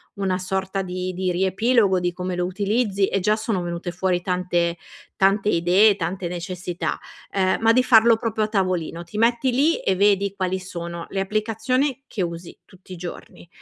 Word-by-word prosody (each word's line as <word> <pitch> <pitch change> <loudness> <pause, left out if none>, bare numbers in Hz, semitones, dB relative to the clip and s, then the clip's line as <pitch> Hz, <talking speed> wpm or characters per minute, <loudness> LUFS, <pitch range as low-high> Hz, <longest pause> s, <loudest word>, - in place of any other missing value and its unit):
una 195 -2 -1
sorta 190 +1 -2
di 185 0 -4
di 185 0 -1
riepilogo 190 +2 +2
di 175 0 0
come 180 +1 -4
lo 175 0 -1
utilizzi, 200 +1 0
e 195 - 0
già 210 +3 +2
sono 215 -4 -2
venute 175 +1 -4
fuori 180 0 0
tante 175 -2 0 0.4
tante 195 +1 +2
idee, 185 +4 +4
tante 185 0 -3
necessità, 180 0 -4 0.4
uhm, 190 -1 +2
ma 225 0 +5
di 255 +2 +4
farlo 230 -2 +6
proprio 220 -1 -1
a - - -4
tavolino. 185 -5 -1
Ti 175 +5 -9
metti 235 +3 +2
lì, 290 +7 +2
e 190 - 0
vedi 200 0 +2
quali 190 -1 -1
sono 170 -2 -6
le 195 - -3
applicazione 230 +7 -1
che 210 - -4
usi 170 0 -6
tutti 185 0 -18
i - - -6
giorni, 175 0 -9
190 Hz, 175 wpm, -23 LUFS, 180-215 Hz, 0.4 s, farlo